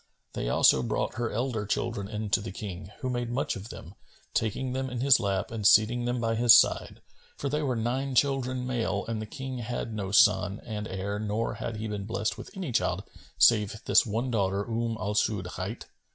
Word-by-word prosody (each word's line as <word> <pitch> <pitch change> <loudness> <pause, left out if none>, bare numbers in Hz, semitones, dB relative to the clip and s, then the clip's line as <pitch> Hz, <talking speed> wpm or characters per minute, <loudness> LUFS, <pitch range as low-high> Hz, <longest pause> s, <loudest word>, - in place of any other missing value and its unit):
They - - -3
also 65 - +5
brought - - -1
her 120 -1 -1
elder 115 -2 -2
children 105 -2 -2
in 105 -1 -5
to 105 - +3
the 105 - -6
King 95 -3 -7
who 130 - -2
made 120 -1 -2
much 140 +5 -1
of 100 +3 -8
them, 90 - -10 0.4
taking 125 +4 -1
them 130 0 -2
in 125 -1 -4
his 135 0 +5
lap 100 -2 -1
and 110 -2 -4
seating 110 +4 +5
them 120 0 -1
by 115 -1 0
his 120 +1 +8
side; - - +1 0.3
for 140 - -2
they 150 +2 -1
were 135 -4 0
nine 130 +4 -2
children 130 -1 +1
male 115 -5 -1
and 115 -1 -3
the 110 - -6
King 130 +1 -6
had 120 -1 -4
no 100 -3 -4
son 100 -2 +4
and 105 -2 -4
heir 100 +2 -3
nor 110 +2 -2
had 115 -2 -5
he 110 +1 -4
been 105 -2 -4
blessed 110 0 -2
with - - -9
any 180 -8 -4
child - - 0 0.3
save 105 -2 +4
this - - +5
one 115 +4 -2
daughter, 100 -2 0
Umm 115 0 -2
al 100 +3 -2
Su'ud 105 -3 0
hight. 95 +5 -5
115 Hz, 210 wpm, -28 LUFS, 105-120 Hz, 0.4 s, his